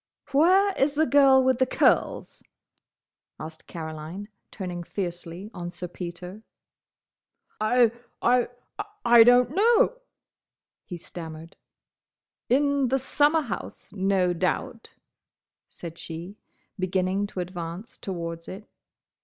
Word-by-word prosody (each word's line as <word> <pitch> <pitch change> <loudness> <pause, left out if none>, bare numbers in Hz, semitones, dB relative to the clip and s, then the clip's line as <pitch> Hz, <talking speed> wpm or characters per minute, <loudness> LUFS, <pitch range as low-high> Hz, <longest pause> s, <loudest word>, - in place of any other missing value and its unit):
"Where 370 +8 +4
is 280 +2 +2
the 315 +2 +3
girl 275 -3 +6
with 260 -1 +2
the 260 - +3
curls?" - - +1 1.0
asked 160 0 -9
Caroline, 160 +5 -7 0.2
turning 180 -3 -6
fiercely 175 +2 -5
on 175 -1 -5
Sir 180 0 -6
Peter. 180 +3 -8 1.2
"I—I—I—don't 245 - +3
know," 460 +7 +3 0.8
he 175 - -7
stammered. 165 -1 -9 0.9
"In 280 +1 +2
the 265 +2 +2
summer 295 +4 +2
house, 225 -11 -7
no 190 -2 +1
doubt," 220 +7 -2 0.8
said 170 -1 -9
she, 170 +4 -7 0.4
beginning 185 +2 0
to 195 - -7
advance 175 +3 -6
towards 170 -3 -5
it. 200 +3 -9
200 Hz, 95 wpm, -26 LUFS, 175-260 Hz, 1.2 s, girl